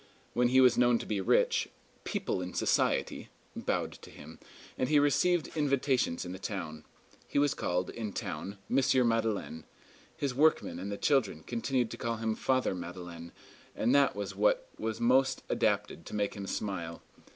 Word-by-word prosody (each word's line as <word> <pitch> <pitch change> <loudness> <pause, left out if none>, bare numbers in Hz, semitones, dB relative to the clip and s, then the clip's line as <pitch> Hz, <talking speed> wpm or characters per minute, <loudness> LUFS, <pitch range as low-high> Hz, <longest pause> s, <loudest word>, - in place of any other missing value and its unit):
When 125 0 +3
he 130 +2 +4
was 125 -2 +6
known 120 -1 +5
to - - -6
be 105 -3 -1
rich, - - +2 0.4
"people - - -2
in 90 0 -6
society" - - +1 0.3
bowed - - -1
to - - -12
him, - - -12 0.4
and 130 - -1
he 150 - +4
received 155 +4 +3
invitations 135 - +1
in 90 - -6
the 95 - -7
town; 85 -7 -5 0.4
he - - -3
was 145 0 +3
called, 90 +1 -1
in 110 -3 -5
town, 100 +1 -5
Monsieur 130 -1 +3
Madeleine; 115 -8 -1 0.5
his 140 -3 -1
workmen 150 - +2
and 100 +3 -5
the 100 - -3
children 110 - +1
continued 120 - -1
to - - -6
call 115 -2 -2
him 110 0 -1
Father 130 +1 +1
Madeleine, 85 -2 -8 0.4
and 120 +4 +2
that 140 -1 +4
was 100 -1 -4
what - - +2
was 110 -1 -3
most 130 +2 +3
adapted 85 - 0
to - - -6
make 100 -1 0
him 100 -1 -6
smile. 85 -6 -4
115 Hz, 170 wpm, -31 LUFS, 95-130 Hz, 0.5 s, was